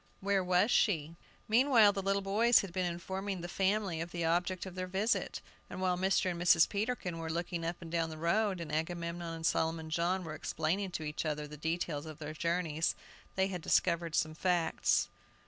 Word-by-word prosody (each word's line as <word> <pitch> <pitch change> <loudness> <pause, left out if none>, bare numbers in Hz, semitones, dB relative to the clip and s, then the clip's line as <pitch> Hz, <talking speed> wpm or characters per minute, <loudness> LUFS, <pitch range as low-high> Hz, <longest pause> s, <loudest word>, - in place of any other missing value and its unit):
Where 200 -1 +1
was 180 +5 +3
she? 165 -9 +2 0.3
Meanwhile 225 -3 +5
the 195 - -2
little 195 +1 0
boys 220 +4 +4
had 195 -4 -8
been 185 -1 0
informing 190 +2 -4
the 175 - -5
family 190 -2 0
of 170 - -4
the 170 -1 -3
object 175 +3 0
of 190 - -7
their 185 0 -4
visit, 195 +5 -1 0.3
and - - -7
while 185 -1 +1
Mr. 185 0 +1
and 170 0 -5
Mrs. 175 -1 +6
Peterkin 200 -5 -2
were 165 0 -4
looking 170 +1 -3
up 170 +1 -4
and 165 - -9
down 165 -1 0
the 160 - -7
road, 185 +4 +1
and 165 -3 -6
Agamemnon 170 +1 -3
and 160 0 -5
Solomon 160 -1 0
John 175 +3 0
were 160 -2 -6
explaining 160 +5 -1
to 160 - -3
each 150 0 -3
other 150 -1 -2
the 150 - -9
details 160 0 -3
of 155 -2 -8
their 155 0 -6
journeys, 165 -1 0 0.4
they 190 0 +2
had 180 -3 -4
discovered 170 -1 +1
some 155 0 +1
facts. 175 -1 +1
175 Hz, 200 wpm, -32 LUFS, 160-190 Hz, 0.4 s, Mrs